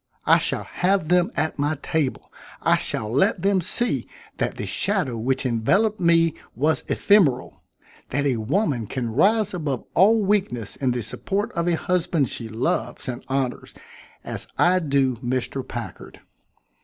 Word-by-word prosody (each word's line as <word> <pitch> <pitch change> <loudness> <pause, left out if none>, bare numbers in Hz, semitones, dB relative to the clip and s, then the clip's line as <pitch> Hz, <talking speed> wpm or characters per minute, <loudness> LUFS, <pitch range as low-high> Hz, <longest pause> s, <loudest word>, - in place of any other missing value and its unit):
I - - +6
shall - - -2
have 185 -3 0
them 180 +1 +3
at 155 0 -1
my 145 +2 0
table 155 -6 -2 0.3
I - - +4
shall 110 - -3
let 140 +7 +2
them 195 -1 +3
see 235 +7 +1 0.3
that - - -2
the - - -4
shadow 190 - 0
which 130 +4 -1
enveloped 195 - +1
me 165 -2 +3 0.2
was 150 +7 +1
ephemeral; 160 -12 +2 0.5
that 145 +2 -1
a 130 -4 +1
woman 130 - 0
can 120 +1 -3
rise 210 - +3
above 150 -8 -3
all 210 +6 +5
weakness 190 - -1
in 130 - -1
the 120 -1 -1
support 200 - -2
of 170 -1 -2
a 175 - +3
husband 170 -5 0
she 115 - -4
loves 115 +1 -2
and 125 0 -5
honors 135 -2 -3 0.5
as - - -6
I 185 +1 +4
do 135 -6 +1
Mr. 130 +2 -2
Packard." 120 -2 -8
150 Hz, 155 wpm, -23 LUFS, 125-185 Hz, 0.5 s, I